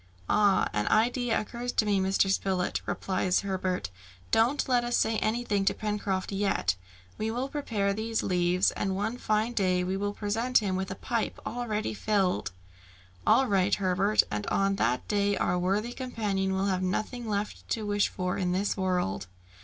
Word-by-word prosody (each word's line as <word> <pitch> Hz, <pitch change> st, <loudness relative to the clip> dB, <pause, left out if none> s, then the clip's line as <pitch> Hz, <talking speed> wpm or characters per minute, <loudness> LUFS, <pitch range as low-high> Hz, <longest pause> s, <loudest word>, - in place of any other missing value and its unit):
"Ah! 205 Hz, -2 st, +3 dB
an 105 Hz, 0 st, 0 dB
idea 240 Hz, +2 st, +2 dB
occurs 240 Hz, +3 st, -4 dB
to 215 Hz, -, +2 dB
me, 205 Hz, -2 st, +2 dB
Mr. 190 Hz, +1 st, +2 dB
Spilett," 190 Hz, -1 st, 0 dB
replied 185 Hz, -1 st, -1 dB
Herbert. 185 Hz, -, -1 dB, 0.4 s
"Don't 240 Hz, +6 st, +3 dB
let 245 Hz, -2 st, +3 dB
us 240 Hz, 0 st, +1 dB
say 220 Hz, 0 st, +2 dB
anything 215 Hz, -3 st, 0 dB
to -, -, +2 dB
Pencroft 205 Hz, -3 st, -2 dB
yet; 195 Hz, -, +1 dB, 0.4 s
we 220 Hz, -, -1 dB
will 245 Hz, +4 st, -2 dB
prepare 220 Hz, -9 st, -1 dB
these 220 Hz, +2 st, -2 dB
leaves, 180 Hz, 0 st, +2 dB
and 195 Hz, -1 st, -2 dB
one 220 Hz, +5 st, -2 dB
fine 215 Hz, +2 st, 0 dB
day 185 Hz, -4 st, +1 dB
we 185 Hz, +1 st, -1 dB
will 205 Hz, +1 st, -2 dB
present 225 Hz, +5 st, +1 dB
him 195 Hz, -4 st, +1 dB
with 190 Hz, +1 st, -2 dB
a 190 Hz, -, -4 dB
pipe 230 Hz, +2 st, -2 dB
already 225 Hz, -3 st, -2 dB
filled!" 195 Hz, -, 0 dB, 0.8 s
"All 270 Hz, -, +5 dB
right, 200 Hz, -3 st, +2 dB
Herbert, 195 Hz, +2 st, +2 dB
and 105 Hz, 0 st, -3 dB
on 195 Hz, 0 st, +1 dB
that 125 Hz, -6 st, 0 dB
day 205 Hz, -1 st, +1 dB
our 180 Hz, 0 st, +1 dB
worthy 205 Hz, +6 st, 0 dB
companion 205 Hz, -7 st, -2 dB
will 190 Hz, +1 st, 0 dB
have 185 Hz, -2 st, 0 dB
nothing 215 Hz, +5 st, -2 dB
left 205 Hz, 0 st, -3 dB
to 220 Hz, -2 st, -1 dB
wish 205 Hz, 0 st, +2 dB
for 180 Hz, -1 st, -2 dB
in 180 Hz, -2 st, 0 dB
this 195 Hz, +2 st, 0 dB
world." 180 Hz, -, -1 dB
200 Hz, 170 wpm, -28 LUFS, 190-220 Hz, 0.8 s, All